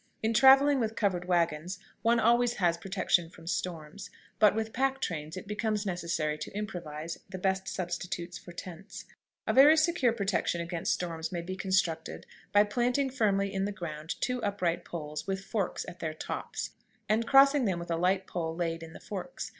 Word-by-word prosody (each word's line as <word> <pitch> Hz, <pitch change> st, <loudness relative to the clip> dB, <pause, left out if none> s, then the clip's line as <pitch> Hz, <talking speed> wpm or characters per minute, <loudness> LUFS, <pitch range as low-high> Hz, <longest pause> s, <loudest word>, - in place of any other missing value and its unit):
In 220 Hz, +1 st, +2 dB
traveling 270 Hz, +4 st, +7 dB
with 225 Hz, -2 st, -1 dB
covered 185 Hz, -4 st, 0 dB
wagons 170 Hz, 0 st, 0 dB, 0.2 s
one 235 Hz, +1 st, +3 dB
always 240 Hz, +2 st, +4 dB
has 175 Hz, -3 st, +2 dB
protection 180 Hz, -2 st, 0 dB
from 165 Hz, -1 st, -15 dB
storms, 175 Hz, +2 st, -4 dB, 0.3 s
but 210 Hz, -1 st, +6 dB
with 220 Hz, 0 st, -2 dB
pack 270 Hz, +1 st, +1 dB
trains 160 Hz, -, -4 dB
it 185 Hz, -, -7 dB
becomes 210 Hz, 0 st, -1 dB
necessary 170 Hz, -5 st, -1 dB
to -, -, -6 dB
improvise 170 Hz, -6 st, -5 dB
the 190 Hz, -, -6 dB
best 190 Hz, 0 st, 0 dB
substitutes 175 Hz, -1 st, -4 dB
for 175 Hz, -, -10 dB
tents. 180 Hz, +2 st, -9 dB, 0.4 s
A -, -, +1 dB
very 290 Hz, +4 st, +8 dB
secure 310 Hz, -6 st, +3 dB
protection 200 Hz, -5 st, 0 dB
against 170 Hz, 0 st, -2 dB
storms 165 Hz, -2 st, -2 dB
may 175 Hz, -2 st, -2 dB
be 185 Hz, +2 st, -5 dB
constructed 185 Hz, -4 st, -1 dB, 0.3 s
by 205 Hz, 0 st, +6 dB
planting 245 Hz, +5 st, 0 dB
firmly 200 Hz, -5 st, +1 dB
in 195 Hz, 0 st, 0 dB
the 205 Hz, -, -2 dB
ground 160 Hz, -4 st, -6 dB
two 250 Hz, 0 st, 0 dB
upright 190 Hz, -5 st, -1 dB
poles, 150 Hz, -1 st, -6 dB
with 195 Hz, 0 st, -3 dB
forks 205 Hz, -5 st, -2 dB
at 175 Hz, -, -9 dB
their 155 Hz, -1 st, -3 dB
tops, -, -, -4 dB, 0.4 s
and 225 Hz, +2 st, +1 dB
crossing 275 Hz, -1 st, +6 dB
them 190 Hz, -4 st, +1 dB
with 170 Hz, 0 st, -6 dB
a -, -, +2 dB
light 185 Hz, +3 st, +1 dB
pole 165 Hz, -3 st, -3 dB
laid 165 Hz, -1 st, -2 dB
in 165 Hz, -1 st, -9 dB
the -, -, -10 dB
forks. 210 Hz, +7 st, -6 dB
190 Hz, 180 wpm, -30 LUFS, 170-220 Hz, 0.4 s, very